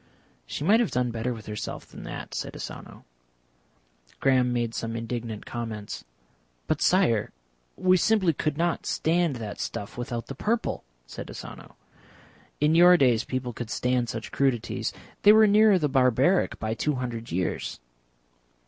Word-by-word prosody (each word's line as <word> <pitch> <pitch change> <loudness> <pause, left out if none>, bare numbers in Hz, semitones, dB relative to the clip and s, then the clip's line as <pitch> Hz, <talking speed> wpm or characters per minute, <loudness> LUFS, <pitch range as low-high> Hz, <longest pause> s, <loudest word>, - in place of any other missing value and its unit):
"She - - -4
might 210 +8 +5
have 235 - +2
done 125 -1 0
better 115 +2 -2
with 110 -3 -7
herself 105 -1 -5
than - - -12
that," - - -7
said - - -4
Asano. - - -9 1.1
Graham 130 -2 +3
made 120 -2 -1
some 115 0 -3
indignant 115 -1 -5
comments. 110 -3 -6 0.6
"But, - - -1
Sire, 160 - +3 0.5
we 185 0 +4
simply 190 -4 +3
could 150 0 -2
not 170 0 0
stand 165 -2 +1
that 110 -4 -6
stuff 105 +4 -5
without 120 -1 -4
the - - -7
purple," 220 - -1 0.2
said - - -8
Asano. - - -10 0.8
"In 150 +2 +3
your 175 +2 +7
days 125 -6 +3
people 125 -2 -3
could 115 -1 -6
stand 125 -1 0
such 110 0 -5
crudities, 125 -4 0 0.3
they 210 - +8
were 220 0 +7
nearer 210 -1 +6
the 155 -4 +1
barbaric 135 +6 +3
by 110 0 -2
two 150 +5 -1
hundred 120 -4 -5
years." 90 +2 -2
125 Hz, 150 wpm, -26 LUFS, 115-170 Hz, 1.1 s, they